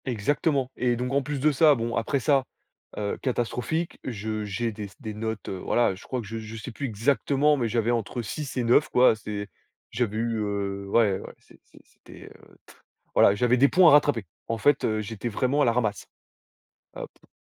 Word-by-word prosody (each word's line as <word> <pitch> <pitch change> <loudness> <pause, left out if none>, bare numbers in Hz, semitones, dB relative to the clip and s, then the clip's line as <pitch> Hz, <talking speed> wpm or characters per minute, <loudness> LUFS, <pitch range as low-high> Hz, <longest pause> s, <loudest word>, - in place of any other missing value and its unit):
Exactement 135 +3 0
et 125 -1 +1
donc 125 +2 -3
en 140 - +3
plus 145 +1 -4
de 150 +3 +3
ça, 150 +1 +5
bon 115 -1 -3
après 115 +4 0
ça, 135 0 +2 0.5
heu, 105 -1 -2
catastrophique, 130 +6 -2
je 110 -3 -4
j'ai 115 +3 -2
des 105 -1 -7
des 110 -6 -6
notes, 110 0 -5
heu, 95 - -4
voilà, 120 +1 +1
je 95 - -12
crois 130 -2 -3
que - - -10
je 115 +2 -5
je 110 0 -8
sais 110 +3 -7
plus 135 +4 -4
exactement, 140 +6 +2
mais 125 -5 -1
j'avais 115 0 0
entre 120 +1 -2
6 135 +5 -6
et 125 - +1
9 120 +6 +3
quoi, 125 -2 +5
c'est 105 -2 -6 0.4
j'avais 110 -4 -1
eu, 115 0 -1
heu, 100 -1 -3
ouais 105 -3 +3
ouais, - - -10
c'est - - -22
c'est - - -20
c'était, - - -15
heu, - - -20
t - - -17 0.4
voilà, 100 - +5
j'avais 125 +3 +2
des 140 +3 +6
points 180 -2 +6
à - - +5
rattraper. 145 -7 +4 0.2
En 115 - -2
fait, 145 +4 +2
heu, 110 -1 0
j'étais 110 +1 -5
vraiment 130 +6 0
à - - +4
la 120 - +3
ramasse. 110 -5 -1 0.9
Heu - - -5
P - - -27
120 Hz, 210 wpm, -26 LUFS, 110-135 Hz, 0.9 s, des